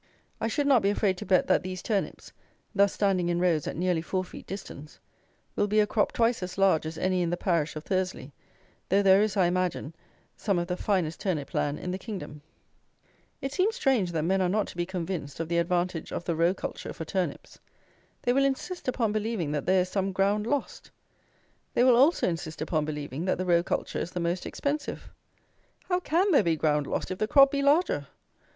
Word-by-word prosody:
I - - -1
should 285 +6 0
not 270 -5 +5
be 195 - +2
afraid 200 -2 +1
to - - -7
bet 185 -1 +4
that - - +3
these 185 0 -6
turnips, 205 -4 -3 0.4
thus 200 -1 +4
standing 190 -4 +1
in 175 0 0
rows 170 -4 +1
at - - -3
nearly 175 -1 +1
four 185 +3 -2
feet 180 - -11
distance, 155 -6 -8 0.6
will 205 - +1
be 210 +1 +2
a 210 - +5
crop 210 0 +1
twice 235 -1 +1
as 185 +1 -5
large 190 -5 +3
as 160 0 -6
any 185 +1 +1
in 170 - 0
the 175 - -1
parish 165 -5 0
of 155 - -6
Thursley, 185 -8 -2 0.6
though 200 +2 +3
there 195 0 +6
is, 210 -2 0
I 185 - +4
imagine, 175 -3 -1 0.4
some 200 -4 0
of 175 - 0
the 180 - -1
finest 180 -5 -1
turnip 165 -8 -2
land 145 0 0
in 180 - -4
the 185 - -4
kingdom. 185 -9 -7 1.0
It 270 +1 -4
seems 395 +7 +1
strange 260 - +1
that 160 -2 0
men 190 +3 +1
are 180 - +2
not 210 +2 +1
to - - -11
be 175 0 -2
convinced 175 -6 -4
of 165 -1 -3
the 170 0 +2
advantage 175 -1 -1
of 170 - -4
the 170 - -1
row 170 +3 +2
culture - - -6
for 165 - -6
turnips. 175 -3 -3 0.6
They 245 - +2
will 275 +2 +3
insist 275 +6 -2
upon 235 -4 +1
believing 215 -7 -2
that 150 -1 -3
there 185 0 +4
is 180 - -3
some 195 0 -1
ground 200 +3 +1
lost. 285 +2 -3 0.9
They 245 - +4
will 255 -1 +6
also 280 +8 +4
insist 165 -2 -4
upon 155 -1 -1
believing 150 +1 -4
that 185 - +1
the 185 - -2
row 170 -1 +4
culture 175 - -2
is - - -3
the 180 - -2
most 175 +1 -2
expensive. 290 +1 -4 0.8
How 360 -1 +2
can 365 +3 +1
there 290 - +6
be 170 -4 +1
ground 150 -2 +1
lost - - -3
if 185 - -4
the 215 - +1
crop 275 +2 +6
be 280 - 0
larger? 280 - +2
185 Hz, 215 wpm, -28 LUFS, 170-215 Hz, 1.0 s, there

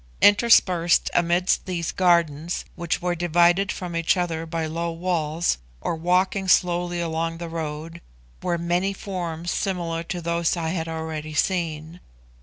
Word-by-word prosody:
Interspersed 195 -5 +4
amidst 175 +3 +2
these 170 -3 -2
gardens, 170 -3 +1
which 170 -1 -2
were 180 -1 +1
divided 175 +3 +3
from 175 -2 -5
each 165 +3 +2
other 165 -2 -2
by 165 0 -2
low 170 +2 -3
walls, 165 - -1 0.2
or 165 - -2
walking 185 +3 +1
slowly 175 -1 +2
along 165 0 -2
the 170 0 -6
road, 165 +1 -5 0.4
were 175 -1 0
many 175 +3 0
forms 175 -4 -4
similar 170 -4 -2
to 175 +1 -5
those 170 0 0
I 165 -1 -2
had 165 -1 -2
already 160 -1 -5
seen. 165 -1 -1
170 Hz, 140 wpm, -24 LUFS, 165-180 Hz, 0.4 s, Interspersed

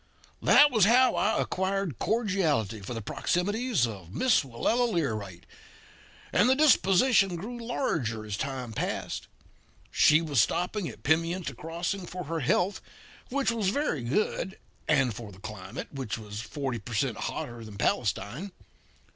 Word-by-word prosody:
"That 290 0 +7
was 215 -6 +4
how 250 +4 +5
I 215 - +1
acquired 190 - -1
cordiality 180 - 0
for 100 +5 -6
the 115 - -5
proximities 205 - 0
of 95 -7 -8
Miss 250 -6 +4
Willella 225 - 0
Learight; 110 - -2 0.9
and 205 +7 +4
the 260 - +5
disposition 215 -7 +4
grew 235 +7 -6
larger 130 - -2
as 105 -2 -3
time 125 0 -4
passed. - - -3 0.6
She 155 0 +5
was 150 -8 +2
stopping 180 - -1
at 115 - -12
Pimienta 165 +1 +1
Crossing 170 +6 -4
for 180 +1 -6
her 165 +1 -3
health, 175 +8 +1 0.5
which 270 -2 +1
was 220 -5 0
very 280 - -1
good, 190 - -1 0.3
and 135 -6 +3
for 110 -1 -8
the 95 - -14
climate, 95 -2 -7
which 130 -5 -4
was 105 -1 -7
forty 135 -1 -4
per 110 +3 -7
cent. 115 +1 0
hotter 120 -1 -5
than 105 -2 -10
Palestine. 120 - -1
160 Hz, 145 wpm, -28 LUFS, -, 0.9 s, That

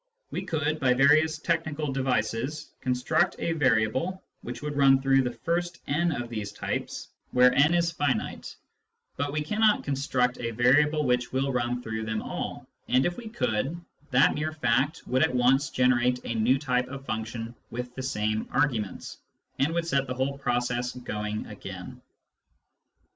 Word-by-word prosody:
We - - -2
could, 155 -1 -1
by 125 -2 +3
various 155 +4 +4
technical 155 -2 -1
devices, 130 +2 -1
con 130 - +1
struct 140 +6 +1
a 170 - -1
variable 130 - +1 0.2
which 125 +4 -7
would 150 -1 -3
run 135 -1 +5
through 135 0 +4
the 125 -1 -1
first 175 +1 -1
n 165 +4 +1
of 120 -5 -3
these 105 -3 -5
types, 105 - -4 0.2
where 125 0 +5
n 150 +6 +4
is 170 -1 +2
finite, 145 -8 -2 0.6
but 140 +1 -2
we 150 +1 -1
cannot 215 +6 +2
construct 130 -3 0
a 115 - -2
variable 145 +6 +3
which 125 -1 +1
will 135 +1 0
run 125 0 -1
through 110 0 -4
them 110 -1 -2
all, - - -5 0.2
and, 130 +2 +3
if 175 - 0
we 235 -2 -8
could, 160 - -1 0.3
that 135 +1 +4
mere 155 +1 -2
fact 135 +2 +1
would 130 +1 +1
at 125 - +2
once 130 +4 +3
generate 125 0 +2
a - - -2
new 115 +4 +3
type 125 -3 0
of 135 +1 -8
function 110 +1 -4 0.2
with 125 +1 -5
the 130 - -6
same 110 -4 -1
arguments, 120 - -1 0.4
and 140 +4 +2
would 170 0 -1
set 140 -4 0
the 125 - -3
whole 135 +2 -1
process 125 -2 -1
going 105 -3 -4
again. - - -9
130 Hz, 165 wpm, -27 LUFS, 120-150 Hz, 0.6 s, run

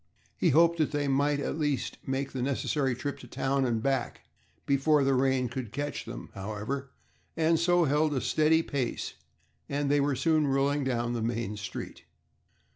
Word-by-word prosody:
He - - +2
hoped 170 +3 +4
that 155 - +2
they 145 -1 -1
might 145 +1 +2
at 145 - -3
least 140 -6 -1
make 135 +1 -2
the 130 - -4
necessary 135 0 0
trip 145 +3 -4
to - - -11
town 135 0 0
and 115 -3 0
back 135 -3 -1 0.4
before 140 +1 +3
the 135 0 +3
rain 130 -1 +2
could 120 -2 -5
catch 145 +3 -4
them, - - -8
however, 110 +8 -4 0.5
and 165 0 +3
so 175 +1 +3
held 150 0 +2
a 130 - 0
steady 160 +1 +3
pace, 135 -7 -3 0.6
and 140 0 0
they 145 0 +4
were 140 -1 +1
soon 155 +2 +2
rolling 140 +1 +1
down 120 -2 -1
the 120 - -2
main 115 -2 -2
street. 105 0 -7
140 Hz, 175 wpm, -29 LUFS, 125-145 Hz, 0.6 s, hoped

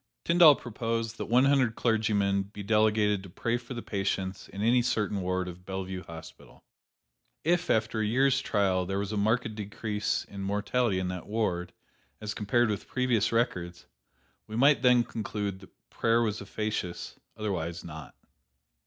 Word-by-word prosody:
Tyndall 170 -3 +7
proposed 115 -1 -3
that - - -3
one 125 +3 +4
hundred 135 -5 +3
clergymen 105 -4 +1
be 100 +1 -8
delegated 105 -1 +2
to 95 - -11
pray 115 +6 -1
for 125 +1 -8
the 120 - -5
patients 95 -2 -3
in 100 - -5
any 120 +2 +4
certain 105 -4 0
ward 90 0 -1
of 90 0 -9
Bellevue 95 0 -5
Hospital. 80 0 -12 0.8
If, 175 +2 +1
after 110 0 +1
a - - +1
year's 135 +4 +3
trial, 95 -3 +1
there 95 +1 -2
was 100 +1 -2
a - - -2
marked 110 +2 +1
decrease 105 -1 -2
in 100 - -8
mortality 105 +2 0
in 95 -1 -1
that 90 -1 -6
ward, 90 -5 -1 0.5
as 105 -1 -4
compared 110 +2 +1
with 105 - -4
previous 125 -5 +1
records, 90 -7 -1 0.6
we 110 - -7
might 140 +2 +5
then 125 -2 +5
conclude 105 -4 -4
that 95 - -19
prayer 115 +1 +2
was 110 -2 -2
efficacious, 100 -3 -4 0.2
otherwise 90 -5 -3
not. 80 -2 -9
105 Hz, 160 wpm, -29 LUFS, 95-115 Hz, 0.8 s, Tyndall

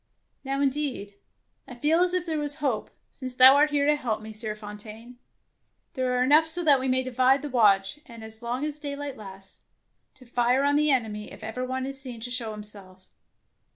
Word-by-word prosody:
" - - -48
Now 275 0 -2
indeed 270 -7 -2 0.5
I 250 - -9
feel 300 +7 +2
as 360 0 +2
if 360 -1 -1
there 320 -3 -2
was 290 -1 -2
hope, 275 -8 -2 0.2
since 255 -2 -7
thou 260 +2 +9
art 295 +1 +4
here 290 -1 +1
to 300 +1 +4
help 240 -7 -2
me, 220 0 -9
Sieur 215 0 -3
Fontaine. 215 +3 -10 0.7
There 255 -2 -1
are 250 - +3
enough 300 +5 +5
so 350 +2 +3
that 290 -4 +5
we 260 - -2
may 260 0 +1
divide 255 +2 +2
the 295 - -4
watch, 205 0 +3
and 230 -3 -11
as 220 +1 -9
long 245 +4 -3
as 300 0 -5
daylight 285 -2 -5
lasts, 195 -2 -13 0.5
to 255 - -18
fire 245 +2 +1
on 285 0 +2
the 300 +1 +3
enemy 220 -6 -1
if - - -12
ever 220 +4 -4
one 260 +1 -3
is 270 0 -5
seen 250 -4 -7
to 245 +2 -6
show 240 -3 -3
him 210 - -8
self. 190 -3 -11
255 Hz, 215 wpm, -26 LUFS, 220-285 Hz, 0.7 s, thou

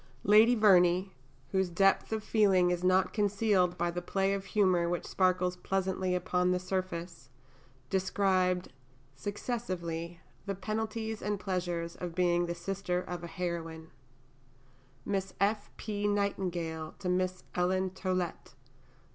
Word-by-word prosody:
Lady 220 +4 +6
Verney, 185 -3 +4 0.4
whose 190 -1 +1
depth 195 +5 +2
of 220 -1 -2
feeling 195 -5 +3
is 175 0 -2
not 185 +1 +3
concealed 200 -3 +2
by 175 +1 0
the 175 +1 -4
play 195 +2 0
of 195 -1 -3
humour 185 -5 +2
which 175 0 -2
sparkles 185 -1 +1
pleasantly 190 0 -1
upon 180 0 +1
the 180 - +2
surface, 180 -6 -4 0.6
described, 185 -3 +1 0.4
successively, 175 - -4 0.3
the 200 - -1
penalties 220 +2 -3
and 205 0 -1
the - - -16
pleasures 175 -3 -2
of 175 -2 -6
being 175 -1 +2
the 170 - -3
sister 180 0 -2
of 175 -1 -6
a - - -4
heroine: 165 -2 -5 1.2
(_Miss 195 -1 -2
F. 205 +2 +1
P. 205 -1 -2
Nightingale 175 -6 -2
to 190 - -5
Miss 185 0 0
Ellen 185 +1 +1
Tollet. 185 -2 -3
185 Hz, 130 wpm, -31 LUFS, 175-195 Hz, 1.2 s, Lady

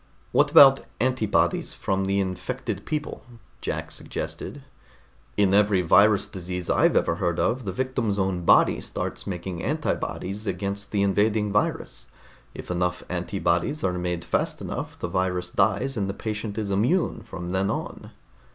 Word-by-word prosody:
"What - - +4
about 135 -1 +8 0.2
antibodies 125 -4 +1
from 95 0 -1
the 100 +1 +1
infected 95 -2 -3
people?" 150 -1 -3 0.4
Jack - - -3
suggested. 145 - -6 0.7
"In 100 -2 +3
every 100 -2 +4
virus 100 +4 +5
disease 90 -3 -4
I've - - +3
ever - - +2
heard 85 -2 0
of, 125 0 0
the 95 - -2
victim's 125 -1 -1
own 95 -2 0
body - - +5
starts - - -5
making 90 -2 -4
antibodies 100 +4 -2
against 100 +2 -3
the 100 -1 +1
invading 105 +1 +2
virus. 105 - -1 0.5
If - - -7
enough 90 0 -1
antibodies 90 - -1
are 90 - +1
made 90 -1 -3
fast - - -1
enough, - - -5
the - - -3
virus 90 0 -1
dies 110 +9 +1
and 100 -3 -1
the 100 - -4
patient 110 -1 -4
is 105 -2 -2
immune 120 - +1
from 90 -1 -7
then 95 +1 0
on." - - -5
100 Hz, 150 wpm, -25 LUFS, 90-105 Hz, 0.7 s, about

